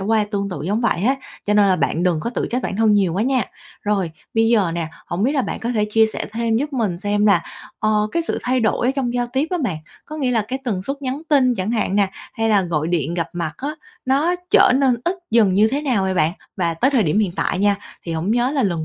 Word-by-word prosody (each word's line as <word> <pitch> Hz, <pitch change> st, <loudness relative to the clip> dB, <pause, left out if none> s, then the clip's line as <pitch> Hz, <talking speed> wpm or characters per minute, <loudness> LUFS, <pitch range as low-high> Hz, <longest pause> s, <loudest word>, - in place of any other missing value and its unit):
qua 215 Hz, +2 st, +2 dB
tương 200 Hz, -1 st, -1 dB
tự 175 Hz, -6 st, -5 dB
giống 210 Hz, +4 st, 0 dB
vậy 185 Hz, -6 st, 0 dB
á, 265 Hz, +3 st, +3 dB, 0.3 s
cho 210 Hz, -, +1 dB
nên 205 Hz, -1 st, +5 dB
là 185 Hz, -, +3 dB
bạn 170 Hz, -, 0 dB
đừng 175 Hz, -4 st, +1 dB
có 235 Hz, -, -3 dB
tự -, -, -2 dB
trách 250 Hz, +1 st, -1 dB
bản 195 Hz, -, -3 dB
thân 220 Hz, -1 st, +4 dB
nhiều 190 Hz, -5 st, +2 dB
quá 195 Hz, -, 0 dB
nha. 255 Hz, -1 st, +2 dB, 0.4 s
Rồi, 195 Hz, -5 st, 0 dB, 0.2 s
bây 225 Hz, 0 st, +3 dB
giờ 205 Hz, -8 st, +3 dB
nè, 165 Hz, -2 st, -2 dB, 0.2 s
hổng 170 Hz, +3 st, -2 dB
biết 265 Hz, +6 st, +2 dB
là 270 Hz, -4 st, +1 dB
bạn -, -, -4 dB
có 235 Hz, -, -2 dB
thể 210 Hz, -1 st, +2 dB
chia 220 Hz, 0 st, +5 dB
sẻ -, -, -4 dB
thêm 225 Hz, 0 st, 0 dB
giúp 290 Hz, +4 st, -2 dB
mình 215 Hz, -10 st, -1 dB
xem 205 Hz, +1 st, +1 dB
là, 175 Hz, -5 st, +4 dB, 0.4 s
ờ, 215 Hz, 0 st, +1 dB
cái 335 Hz, -, +1 dB
sự 330 Hz, -, -2 dB
thay 255 Hz, 0 st, +1 dB
đổi 230 Hz, +2 st, +1 dB
ở -, -, +4 dB
trong 245 Hz, -3 st, -1 dB
giao 245 Hz, 0 st, 0 dB
tiếp 275 Hz, +4 st, +1 dB
á 360 Hz, -, 0 dB
bạn, 180 Hz, -8 st, -1 dB, 0.3 s
có 310 Hz, -, -8 dB
nghĩa 265 Hz, -4 st, 0 dB
là 225 Hz, -3 st, +2 dB
cái 265 Hz, +1 st, -2 dB
tần 195 Hz, -6 st, -2 dB
suất 275 Hz, +5 st, -5 dB
nhắn 265 Hz, +3 st, -3 dB
tin 260 Hz, -4 st, +4 dB
chẳng 190 Hz, +1 st, -2 dB
hạn 210 Hz, -4 st, 0 dB
nè, 200 Hz, -2 st, +3 dB, 0.2 s
hay 225 Hz, 0 st, -1 dB
là 205 Hz, -3 st, +4 dB
gọi 160 Hz, -3 st, -1 dB
điện 170 Hz, -1 st, -1 dB
gặp 170 Hz, -2 st, -2 dB
mặt 170 Hz, -3 st, -3 dB
á, 280 Hz, -, -4 dB, 0.4 s
nó 290 Hz, +7 st, +2 dB, 0.2 s
trở -, -, +6 dB
nên 265 Hz, -3 st, +3 dB
ít 350 Hz, +2 st, +1 dB, 0.2 s
dần 215 Hz, -5 st, +4 dB
như 215 Hz, +3 st, +5 dB
thế 280 Hz, +4 st, -1 dB
nào 245 Hz, -9 st, +1 dB
vậy 190 Hz, 0 st, 0 dB
bạn? 165 Hz, -2 st, +2 dB, 0.2 s
Và 170 Hz, -3 st, 0 dB
tới 260 Hz, +11 st, +2 dB
thời 250 Hz, -6 st, +3 dB
điểm 165 Hz, +4 st, +1 dB
hiện 205 Hz, -5 st, +2 dB
tại -, -, 0 dB
nha, 205 Hz, 0 st, +3 dB, 0.3 s
thì 165 Hz, -, -5 dB
hổng 165 Hz, +6 st, -2 dB
nhớ 245 Hz, +2 st, +2 dB
là 280 Hz, -3 st, 0 dB
lần 170 Hz, -6 st, -1 dB
215 Hz, 275 wpm, -20 LUFS, 185-250 Hz, 0.4 s, trở